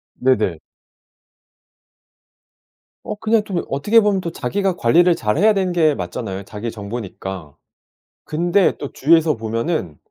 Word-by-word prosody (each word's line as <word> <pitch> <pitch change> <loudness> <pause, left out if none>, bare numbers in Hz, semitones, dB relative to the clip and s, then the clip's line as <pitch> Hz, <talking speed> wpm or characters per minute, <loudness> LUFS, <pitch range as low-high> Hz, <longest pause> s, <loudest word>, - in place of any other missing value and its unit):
네네. 110 -10 +1 2.5
어 - - -4
그냥 220 +1 +1
또 200 - -8
이 - - -1
어떻게 205 +12 +3
보면 205 -2 +1
또 170 - -3
자기가 190 +7 -1
관리를 175 +6 +4
잘해야 165 - +2
되는 190 -2 0
게 155 -4 +3
맞잖아요 95 +2 -5
자기 105 +3 -6
정보니까. 95 -7 -7 0.7
근데 175 +4 +1
또 145 - -6
주위에서 160 +1 +3
보면은 115 - -3
145 Hz, 265 characters per minute, -20 LUFS, -, 2.5 s, 관리를